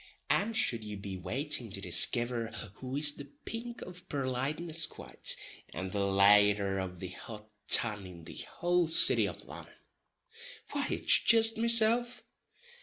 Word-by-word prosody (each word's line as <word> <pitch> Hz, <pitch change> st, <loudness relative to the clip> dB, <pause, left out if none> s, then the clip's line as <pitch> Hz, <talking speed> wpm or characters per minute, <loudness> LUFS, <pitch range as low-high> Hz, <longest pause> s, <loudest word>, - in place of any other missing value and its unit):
And 220 Hz, +2 st, 0 dB
shud 115 Hz, -, +1 dB
ye 105 Hz, -1 st, -6 dB
be 100 Hz, -1 st, -7 dB
wantin' 130 Hz, -, -3 dB
to 95 Hz, -, -2 dB
diskiver 120 Hz, +3 st, +2 dB, 0.3 s
who 130 Hz, 0 st, -7 dB
is 150 Hz, +1 st, +3 dB
the 145 Hz, -1 st, -10 dB, 0.2 s
pink 235 Hz, +1 st, -7 dB
of 180 Hz, 0 st, -13 dB
purliteness 145 Hz, +5 st, -2 dB
quite, -, -, -2 dB, 0.4 s
and 95 Hz, +2 st, -5 dB
the 105 Hz, -, -3 dB
laider 100 Hz, 0 st, +3 dB
of 90 Hz, -1 st, -9 dB
the 95 Hz, -, -6 dB
hot 105 Hz, +3 st, -10 dB, 0.2 s
tun 105 Hz, -4 st, +3 dB
in 85 Hz, -2 st, -13 dB
the -, -, -8 dB, 0.2 s
houl 175 Hz, -1 st, +1 dB
city 165 Hz, -, +5 dB
o' -, -, -7 dB
Lonon—why 470 Hz, +2 st, -10 dB
it's -, -, +3 dB
jist 225 Hz, -1 st, +4 dB
mesilf. 235 Hz, +2 st, +1 dB
130 Hz, 140 wpm, -30 LUFS, -, 0.4 s, city